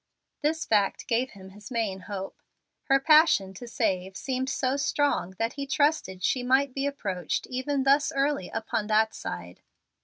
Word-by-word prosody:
This 310 +1 0
fact 205 -3 +1
gave 245 +2 0
him 190 -1 -12
his 205 +1 -12
main 225 -6 -2
hope. 195 0 -7 0.4
Her 275 0 +4
passion 300 - +5
to 240 +6 -9
save 190 -6 -1
seemed 260 0 -2
so 260 0 0
strong 280 -9 0
that 230 +3 -1
he 280 -1 -5
trusted 275 - +1
she 255 - +1
might 265 +2 +2
be 275 +1 -1
approached 195 - -3
even 265 +2 -1
thus 280 +2 +3
early 275 -8 0
upon 220 -1 -2
that 220 0 +3
side. 85 0 -7
245 Hz, 160 wpm, -27 LUFS, 195-275 Hz, 0.4 s, passion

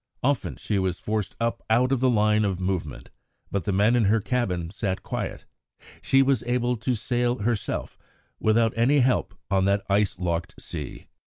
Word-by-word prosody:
Often 140 0 0
she 105 -2 -2
was 95 -2 -1
forced 105 -2 -2
up 115 0 -1
out 125 +4 +3
of 135 - +2
the 130 +1 +3
line 105 -2 +3
of 95 -3 -1
movement, 90 -6 -3 0.4
but 100 - -2
the 105 - 0
men 105 +5 +3
in 120 -3 +3
her 110 +3 +3
cabin 95 -8 -1
sat 95 -2 -3
quiet; - - -4 0.6
she 135 0 +4
was 135 -4 +2
able 125 0 +1
to 120 +3 -1
"sail 120 +2 0
herself" 115 -1 -2 0.4
without 115 +1 +3
any 130 +5 +4
help 125 -7 +1 0.2
on 95 -1 +3
that 100 0 +1
ice 100 -1 +2
locked 85 -1 -3
sea. 75 -5 -7
110 Hz, 175 wpm, -25 LUFS, 95-120 Hz, 0.6 s, she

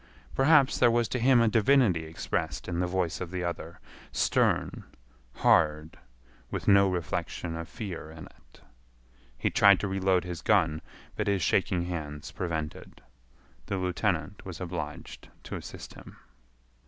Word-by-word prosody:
Perhaps 140 0 +4
there 120 - +6
was 120 0 +2
to 125 - -2
him 125 +1 +5
a 115 - +4
divinity 110 -6 +3
expressed 80 +1 -3
in 85 -1 -2
the 90 - +1
voice 90 -1 -1
of 90 - -4
the 90 0 -4
other—stern, 85 -1 -2 0.5
hard, 75 0 +2 0.5
with - - -5
no 100 -1 +6
reflection 85 -1 -3
of 80 0 -6
fear 90 -8 -6
in 80 0 -10
it. - - -21 0.8
He - - 0
tried 100 -2 +6
to 100 - -1
reload 95 -1 +1
his 90 -2 -6
gun, 80 -7 +2 0.3
but 105 - -2
his 100 -4 +1
shaking 85 +2 +1
hands 75 -4 -5
prevented. 80 -4 -5 0.7
The 100 - -2
lieutenant 90 -1 -2
was 90 -3 -8
obliged 85 -5 -6
to - - -6
assist - - -9
him. - - -13
90 Hz, 140 wpm, -28 LUFS, 80-100 Hz, 0.8 s, there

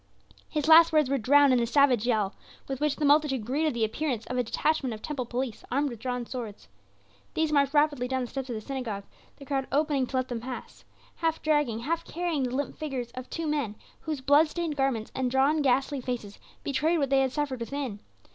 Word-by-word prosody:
His 300 0 -1
last 330 +1 +8
words 305 -4 +3
were 275 - +2
drowned 285 +3 +5
in 250 - +4
the 235 - 0
savage 250 -3 +3
yell 215 -4 +1 0.3
with 270 0 -4
which 300 -1 +1
the 300 - -1
multitude 285 -5 +3
greeted 290 +3 0
the 230 - 0
appearance 240 0 -2
of 250 - -4
a 250 - +2
detachment 265 0 0
of 215 - -13
temple 275 -6 -3
police 245 -2 -3
armed 280 +2 0
with 235 - -8
drawn 250 0 -3
swords. 230 -5 -7 0.7
These 320 -1 +1
marched 280 -1 +2
rapidly 290 -4 +3
down 260 0 -1
the 250 - -3
steps 265 +1 -5
of 240 - -3
the 215 - -5
synagogue 230 -6 -4 0.3
the 280 - -11
crowd 270 -1 -1
opening 285 -2 +1
to 265 - -6
let 255 0 +1
them 240 -2 -4
pass 255 +1 -8 0.3
half 325 -1 0
dragging, 295 -7 +1
half 330 +6 -1
carrying 340 -3 -2
the 255 -1 -1
limp 280 -1 -3
figures 265 -6 -4
of 255 +1 -8
two 330 - -4
men, 290 -9 -1 0.2
whose 305 -4 -4
blood 285 +4 +5
stained 330 -1 -3
garments 270 -6 -1
and 260 -1 -1
drawn, 275 +4 +3
ghastly 270 +1 +1
faces 240 -5 -5 0.2
betrayed 310 +5 +1
what 280 -3 0
they 270 0 +5
had 265 -1 +1
suffered 285 -3 -2
within. 245 -3 -4
270 Hz, 215 wpm, -28 LUFS, 245-295 Hz, 0.7 s, last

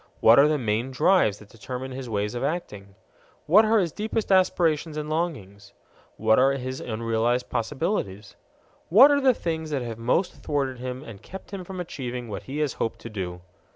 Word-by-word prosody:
What 115 +4 +7
are 145 - +7
the 155 0 +1
main 115 0 -1
drives 140 - +3
that 105 -1 -16
determine 125 +4 -7
his 130 -1 -6
ways 105 0 -2
of 120 - -4
acting? 105 - -4 0.5
What 200 +8 +6
are 220 +1 +3
his 180 -6 +1
deepest 215 +2 -3
aspirations 165 -4 +2
and 150 0 -4
longings? 100 - -4 0.4
What 110 +1 +3
are 135 +2 +4
his 130 -1 -5
unrealized 115 +2 -1
possibilities? 115 - -3 0.5
What 255 - +8
are 285 0 +3
the 260 -3 +4
things 160 -4 -3
that 140 -4 -2
have 115 -2 -6
most 170 +10 +1
thwarted 135 -4 -2
him 125 +1 -5
and 110 -8 -11
kept 190 0 -11
him 195 -2 -5
from 185 +1 -8
achieving 125 -8 -5
what 105 - -5
he 140 - -4
has 140 - -5
hoped 115 - -1
to 115 - -8
do? 90 -4 -5
130 Hz, 190 wpm, -25 LUFS, 115-170 Hz, 0.5 s, What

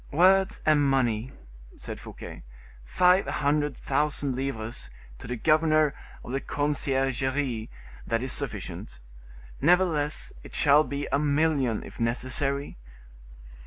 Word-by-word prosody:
"Words 190 +5 +3
and 150 -2 +4
money," 130 -3 +1 0.5
said - - -7
Fouquet, - - -9 0.4
"five 180 - +3
hundred 145 -1 0
thousand 140 -1 -1
livres 120 - -4 0.3
to - - -9
the 125 - -3
governor 155 +2 +3 0.3
of - - -8
the 135 +1 -1
conciergerie 135 -4 -1 0.4
that 115 +1 0
is 130 - -1
sufficient; 60 - -4 0.6
nevertheless, 165 -3 +2
it - - -11
shall 145 +1 +5
be 140 -1 -4
a 140 - +2
million, 145 -5 +1
if - - -12
necessary." 130 - -1
140 Hz, 115 wpm, -27 LUFS, 130-150 Hz, 0.6 s, shall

